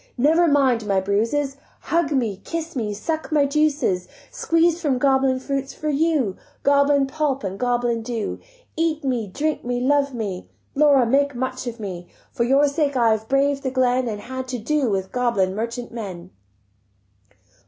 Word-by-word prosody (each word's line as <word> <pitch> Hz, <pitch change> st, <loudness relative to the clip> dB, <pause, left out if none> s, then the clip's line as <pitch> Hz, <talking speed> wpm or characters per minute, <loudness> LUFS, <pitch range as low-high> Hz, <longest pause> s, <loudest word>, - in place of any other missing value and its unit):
Never 320 Hz, +7 st, +4 dB
mind 260 Hz, -7 st, +2 dB
my 195 Hz, -2 st, +2 dB
bruises, 230 Hz, +9 st, 0 dB, 0.2 s
Hug 335 Hz, -3 st, 0 dB
me, 225 Hz, -8 st, -1 dB
kiss 330 Hz, -1 st, -5 dB
me, 220 Hz, -5 st, -2 dB
suck 315 Hz, +11 st, -4 dB
my 295 Hz, -2 st, +4 dB
juices 280 Hz, -11 st, +1 dB, 0.2 s
Squeez'd 330 Hz, 0 st, +2 dB
from 290 Hz, -7 st, 0 dB
goblin 265 Hz, 0 st, +2 dB
fruits 275 Hz, 0 st, -3 dB
for 305 Hz, -, -3 dB
you, 290 Hz, -, +1 dB, 0.3 s
Goblin 280 Hz, 0 st, +4 dB
pulp 275 Hz, -1 st, -1 dB
and 195 Hz, 0 st, -4 dB
goblin 240 Hz, -2 st, 0 dB
dew. 225 Hz, -2 st, -4 dB, 0.4 s
Eat 320 Hz, -1 st, 0 dB
me, 245 Hz, -5 st, -1 dB
drink 295 Hz, +10 st, -2 dB
me, 245 Hz, 0 st, -2 dB
love 280 Hz, +2 st, +2 dB
me; 200 Hz, -5 st, -5 dB, 0.2 s
Laura, 280 Hz, -3 st, +5 dB
make 280 Hz, +3 st, +2 dB
much 255 Hz, +1 st, -3 dB
of 235 Hz, 0 st, -5 dB
me; 180 Hz, -4 st, -6 dB, 0.2 s
For 235 Hz, -, 0 dB
your 275 Hz, +4 st, +4 dB
sake 285 Hz, -1 st, 0 dB
I 230 Hz, -2 st, +4 dB
have 220 Hz, 0 st, -1 dB
braved 275 Hz, +1 st, +2 dB
the 270 Hz, -, -2 dB
glen 255 Hz, -1 st, +1 dB
And 210 Hz, -2 st, -4 dB
had 260 Hz, +2 st, -6 dB
to 255 Hz, -1 st, -3 dB
do 270 Hz, +3 st, 0 dB
with 190 Hz, -2 st, -2 dB
goblin 235 Hz, -7 st, +1 dB
merchant 235 Hz, +3 st, -4 dB
men." 190 Hz, -6 st, -7 dB
260 Hz, 165 wpm, -22 LUFS, 230-285 Hz, 0.4 s, Laura